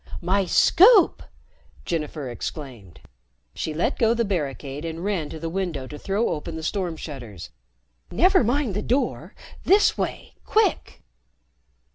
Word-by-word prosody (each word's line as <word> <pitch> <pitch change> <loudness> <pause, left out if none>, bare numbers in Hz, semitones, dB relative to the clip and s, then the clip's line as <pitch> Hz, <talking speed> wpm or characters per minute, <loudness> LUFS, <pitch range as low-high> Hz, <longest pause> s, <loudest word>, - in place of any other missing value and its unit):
"My 190 +3 +1
Scoop!" 385 - +5 0.6
Jennifer 150 -4 -3
exclaimed. 120 - -8 0.5
She 160 - -4
let 155 +3 -1
go 230 0 +3
the 235 0 0
barricade 145 -6 -3
and 165 +1 -5
ran 190 -7 -2
to 160 - -8
the 165 - -4
window 170 -6 -3
to 150 +3 -9
throw 205 +4 0
open 160 +2 -4
the 160 - -6
storm 180 -3 -2
shutters. 120 - -8 0.6
"Never 370 -2 +4
mind 245 -1 0
the 205 - -2
door. 255 +6 -2 0.3
This 405 +3 +4
way, - - -4
quick!" 435 +1 0
170 Hz, 135 wpm, -24 LUFS, 150-220 Hz, 0.6 s, Scoop